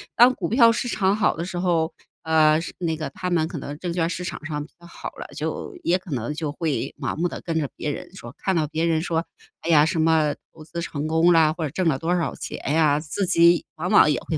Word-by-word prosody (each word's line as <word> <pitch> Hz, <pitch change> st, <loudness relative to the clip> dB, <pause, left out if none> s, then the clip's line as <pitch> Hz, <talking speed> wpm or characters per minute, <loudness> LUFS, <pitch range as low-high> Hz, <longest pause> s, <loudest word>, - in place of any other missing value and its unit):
当 245 Hz, +2 st, +7 dB
股 175 Hz, -8 st, -4 dB
票 230 Hz, 0 st, +6 dB
市 235 Hz, +2 st, -2 dB
场 195 Hz, -4 st, +1 dB
好 215 Hz, 0 st, +2 dB
的 165 Hz, -, -3 dB
时 180 Hz, -1 st, -4 dB
候， 170 Hz, -3 st, +1 dB, 0.3 s
呃， 155 Hz, -1 st, +4 dB
是 165 Hz, -, -6 dB
那 165 Hz, -3 st, -1 dB
个 155 Hz, -3 st, -4 dB
他 180 Hz, +6 st, -4 dB
们 165 Hz, -3 st, +1 dB
可 170 Hz, 0 st, -6 dB
能 145 Hz, +2 st, -7 dB
证 175 Hz, -1 st, -3 dB
券 170 Hz, -1 st, 0 dB
市 180 Hz, -, -4 dB
场 180 Hz, -, -6 dB
上 150 Hz, -2 st, -3 dB
比 -, -, -20 dB
较 170 Hz, -, -16 dB
好 -, -, -7 dB
了， -, -, -9 dB
就 405 Hz, -, -4 dB
也 175 Hz, -, +3 dB
可 180 Hz, -2 st, -12 dB
能 125 Hz, +1 st, -2 dB
就 150 Hz, -1 st, -3 dB
会 145 Hz, -3 st, -2 dB
盲 -, -, -2 dB
目 175 Hz, +2 st, 0 dB
地 -, -, -6 dB
跟 165 Hz, -2 st, -2 dB
着 145 Hz, -3 st, -2 dB
别 150 Hz, -, -3 dB
人 160 Hz, -, -8 dB
说， 120 Hz, -10 st, -10 dB
看 190 Hz, -, -1 dB
到 160 Hz, -2 st, +2 dB
别 160 Hz, +2 st, -2 dB
人 160 Hz, -1 st, +1 dB
说， 165 Hz, 0 st, -1 dB, 0.4 s
哎 -, -, -4 dB
呀， 150 Hz, -2 st, +6 dB
什 165 Hz, +1 st, -1 dB
么 160 Hz, -2 st, +3 dB, 0.2 s
投 155 Hz, -, -13 dB
资 165 Hz, +2 st, -6 dB
成 155 Hz, -3 st, -4 dB
功 160 Hz, +2 st, +4 dB
啦， 160 Hz, -2 st, +5 dB
或 165 Hz, 0 st, -5 dB
者 155 Hz, -, -1 dB
挣 175 Hz, +5 st, -1 dB
了 145 Hz, -5 st, +2 dB
多 165 Hz, +5 st, -1 dB
少 170 Hz, -2 st, -1 dB
钱 -, -, -6 dB, 0.2 s
呀， 150 Hz, -2 st, +3 dB
自 160 Hz, +6 st, -2 dB
己 170 Hz, 0 st, +4 dB
往 165 Hz, +3 st, -3 dB
往 150 Hz, -, +6 dB
也 -, -, 0 dB
会 160 Hz, -, -3 dB
165 Hz, 285 characters per minute, -23 LUFS, 155-175 Hz, 0.4 s, 当